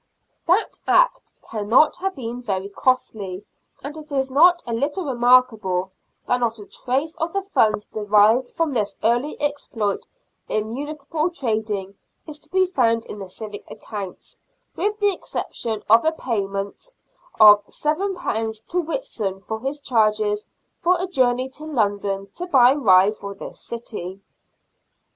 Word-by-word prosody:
That 360 +6 +2
Act - - +3 0.2
cannot 225 +7 +3
have 385 +1 -2
been 245 -2 -5
very 195 -4 -3
costly, 205 -4 -1 0.4
and 285 +2 -6
it 310 -1 -10
is 265 -1 0
not 345 +5 +5
a 235 - -3
little 290 +9 -1
remarkable 240 -8 +3 0.3
that 245 - +1
not 235 -1 0
a 205 - -10
trace 275 +10 -2
of 330 0 -2
the 395 0 -1
funds 215 - +2
derived 215 +4 +3
from 330 -4 -1
this 210 -4 -1
early 240 +6 +1
exploit 245 -8 -2 0.4
in 215 +1 -1
municipal 300 +4 -3
trading 215 - -3 0.3
is 300 -2 -8
to 305 - -14
be 375 +2 +3
found 230 -10 +1
in 205 - -8
the 195 -2 -7
civic 210 +2 -8
accounts, 205 -3 -7 0.4
with 420 +1 -1
the 410 -1 +3
exception 225 - -4
of 225 +2 +6
a 320 - +3
payment 200 - -3 0.5
of 210 -1 +9
£y 305 - -1 0.2
to 360 - 0
Whitson 220 - -3
for 220 +2 -5
his 270 +5 -2
charges 215 -5 +1 0.3
for 355 +1 +2
a 365 - -1
journey 255 -7 +1
to 285 +3 -7
London 205 -8 -1
to 355 - -5
buy 260 -6 +6
rye 200 -8 +5
for 200 -2 -8
this - - -9
city. 205 -5 -6
240 Hz, 145 wpm, -22 LUFS, 210-300 Hz, 0.5 s, of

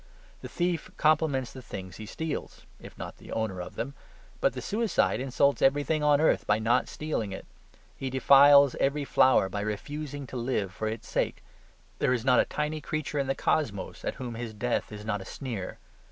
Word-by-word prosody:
The - - -7
thief 175 -1 -1
compliments 150 -5 +2
the 130 - -9
things 95 -6 -8
he 110 - -8
steals, 160 +6 -5
if - - -12
not - - -7
the - - -13
owner 110 -5 -2
of 90 - -8
them. 135 +4 -4 0.5
But - - +2
the - - -5
suicide 225 +1 +1
insults 135 +2 +1
everything 145 +3 +2
on 150 -1 +4
earth 160 - +2
by 105 - +4
not 115 +2 +2
stealing 150 -10 -3
it. 95 - -7 0.5
He 135 - -4
defiles 140 +1 +7
every 140 +1 +1
flower 130 -7 +4
by 100 +2 -4
refusing 145 +7 -4
to 130 - -7
live 115 -6 -1
for 110 - -3
its 110 0 -5
sake. - - -1 0.6
There 125 - +2
is 120 -1 -2
not 125 -2 +5
a - - +4
tiny 150 +1 -3
creature 150 0 -3
in 135 - 0
the 135 - 0
cosmos 110 -13 -1
at - - -2
whom 125 -2 -6
his 115 -1 -6
death 120 +2 -1
is 105 0 -8
not 105 -2 -1
a - - -9
sneer. 110 -6 -5
130 Hz, 195 wpm, -28 LUFS, 110-145 Hz, 0.6 s, defiles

